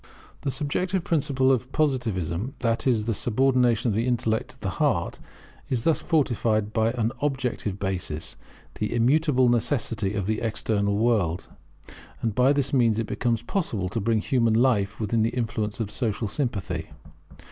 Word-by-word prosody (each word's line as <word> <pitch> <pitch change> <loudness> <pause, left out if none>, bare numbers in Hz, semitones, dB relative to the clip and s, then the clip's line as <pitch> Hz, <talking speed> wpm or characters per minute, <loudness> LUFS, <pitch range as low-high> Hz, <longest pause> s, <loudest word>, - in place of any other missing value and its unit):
The 140 - -1
subjective 165 +7 -1
principle 140 -5 +2
of 130 0 0
Positivism, 120 - -1
that 115 +1 0
is, 115 -5 +2
the 115 - 0
subordination 120 0 +2
of - - 0
the 115 +4 0
intellect 115 -2 0
to 130 0 -14
the 95 - -2
heart 130 - +1 0.5
is 120 -3 -1
thus 165 +2 +2
fortified 115 -9 +1
by 110 0 +2
an 115 -2 0
objective 125 -8 -1
basis, 95 -6 -3 0.4
the 105 - -1
immutable 130 +2 +3
Necessity 115 -4 0
of 100 -3 -1
the 110 +1 -1
external 105 -2 0
world; 105 -7 +1 0.7
and 115 -2 -1
by 125 +5 +4
this 140 -1 0
means 115 -5 +3
it 115 - 0
becomes 115 0 -1
possible 115 - -2
to 115 - -2
bring 110 +1 +1
human 115 -2 +2
life 110 -5 +2
within 110 +1 0
the 115 +3 0
influence 110 -3 -2
of 110 -2 -3
social 110 -2 -1
sympathy. 115 -3 -3
115 Hz, 160 wpm, -25 LUFS, 105-130 Hz, 0.7 s, by